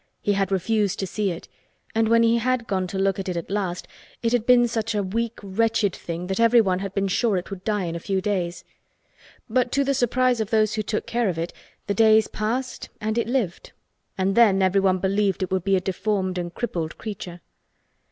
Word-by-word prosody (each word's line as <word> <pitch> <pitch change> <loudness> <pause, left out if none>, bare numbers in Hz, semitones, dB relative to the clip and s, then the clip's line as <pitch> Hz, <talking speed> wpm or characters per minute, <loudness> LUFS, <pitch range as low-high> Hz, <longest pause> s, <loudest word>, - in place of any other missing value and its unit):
He 205 - +1
had 195 -1 0
refused 200 +1 +1
to 195 - -2
see 200 +2 -1
it, 170 -1 -6 0.5
and 225 0 +2
when 230 0 +5
he 230 +1 +3
had 250 0 0
gone 190 -3 -1
to 190 - -5
look 195 0 +1
at 190 - -3
it 180 - -2
at 170 - -5
last 190 -3 -2 0.4
it 230 - +1
had 240 -2 +1
been, 245 -1 +6
such 225 -1 -2
a 205 - +1
weak 230 +4 -2
wretched 215 0 +1
thing 170 +1 -5
that 190 +3 -3
everyone 230 -5 +4
had 195 0 -5
been 195 0 +1
sure 205 +1 +1
it 180 - -5
would 190 -2 -7
die 210 -3 0
in 170 -1 -3
a - - -3
few 190 +3 -1
days. 185 -3 -2 0.8
But 245 +1 +1
to 280 - +3
the 275 0 +1
surprise 250 -1 +2
of 215 - -3
those 215 -1 +2
who 215 - -1
took 215 +1 -2
care 235 -3 0
of 170 - -3
it 165 +1 -3 0.3
the 200 - -1
days 220 +1 +5
passed 245 +4 -3
and 215 +1 -2
it 235 - 0
lived 235 -9 -2 0.4
and 190 +1 +1
then 195 -4 +5
everyone 190 0 +3
believed 195 0 0
it 185 - -4
would 190 -2 0
be 195 0 +2
a - - +3
deformed 185 0 -1
and 175 -1 -4
crippled 170 -8 -4
creature. 180 -5 -7
200 Hz, 220 wpm, -24 LUFS, 185-230 Hz, 0.8 s, been